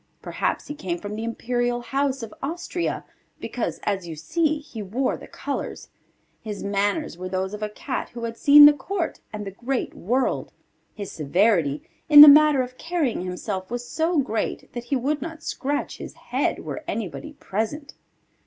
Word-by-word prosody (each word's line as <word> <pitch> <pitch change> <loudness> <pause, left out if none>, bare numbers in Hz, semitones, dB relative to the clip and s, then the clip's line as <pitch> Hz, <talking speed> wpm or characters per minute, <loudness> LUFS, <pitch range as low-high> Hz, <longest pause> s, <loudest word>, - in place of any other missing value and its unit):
Perhaps - - -2
he 295 - -6
came 185 -11 -4
from 205 +3 -6
the 220 - -4
imperial 240 +1 -1
house 270 0 -1
of 220 - -7
Austria, 345 +4 -3 0.3
because, - - -3
as 195 -4 -2
you 165 - -6
see, 310 - 0
he 285 -7 -9
wore 235 +7 -1
the - - -11
colours. - - -5 0.5
His 210 -2 -6
manners 200 - -1
were 185 0 -5
those 190 +1 -2
of 210 - -6
a 210 - -2
Cat 255 +5 -4
who 235 -1 -8
had 230 0 -3
seen 290 +4 +9
the 295 - +9
court 335 +4 -3
and 210 -1 -6
the 195 - -5
great 245 +6 -3
world. 250 +8 -1 0.4
His 200 -3 -6
severity, 160 -1 +1 0.3
in 295 -1 +11
the 300 - +13
matter 295 -2 +7
of 255 0 -10
carrying 330 - -1
himself, 185 +1 -4
was 245 +1 -4
so 330 +1 0
great 255 -6 -2
that 240 -1 -6
he 275 - 0
would 280 +3 -1
not 325 +1 -7
scratch 285 +2 -3
his - - -8
head - - -2
were - - -5
anybody 230 - -4
present. 280 +5 -4
240 Hz, 175 wpm, -24 LUFS, 205-290 Hz, 0.5 s, the